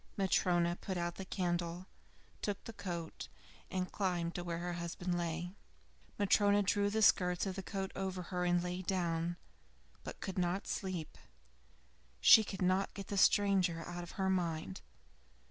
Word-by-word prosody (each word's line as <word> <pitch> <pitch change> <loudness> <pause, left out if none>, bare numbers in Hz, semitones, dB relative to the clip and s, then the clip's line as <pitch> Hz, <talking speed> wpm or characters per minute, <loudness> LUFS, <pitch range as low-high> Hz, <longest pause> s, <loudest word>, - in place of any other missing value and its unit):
Matryona 175 -3 +2
put 190 -2 -3
out 175 0 -2
the 190 - -5
candle, 175 -1 -2 0.6
took 205 -2 -3
the 230 - -8
coat, 170 -5 -5 0.4
and 185 -1 -2
climbed 175 -4 -1
to 175 - -4
where 170 -1 -3
her 175 +1 -3
husband 175 +1 -3
lay. 170 +1 -3 0.6
Matryona 205 0 +4
drew 200 +1 +2
the 220 +1 +1
skirts 180 -2 +4
of 190 -1 -3
the 195 - -4
coat 190 0 -4
over 190 -1 -3
her 180 0 0
and 175 0 +2
lay 180 +1 -3
down, 175 -2 -1 0.7
but - - -7
could 190 -1 -3
not 180 +2 0
sleep; 180 -5 -4 1.0
she 220 - +9
could 195 -2 -4
not 185 +2 +1
get 200 -1 -7
the 205 - -2
stranger 190 -4 +4
out 175 0 -5
of 175 - -9
her 190 -1 -1
mind. 180 -1 -1
180 Hz, 160 wpm, -35 LUFS, 175-195 Hz, 1.0 s, she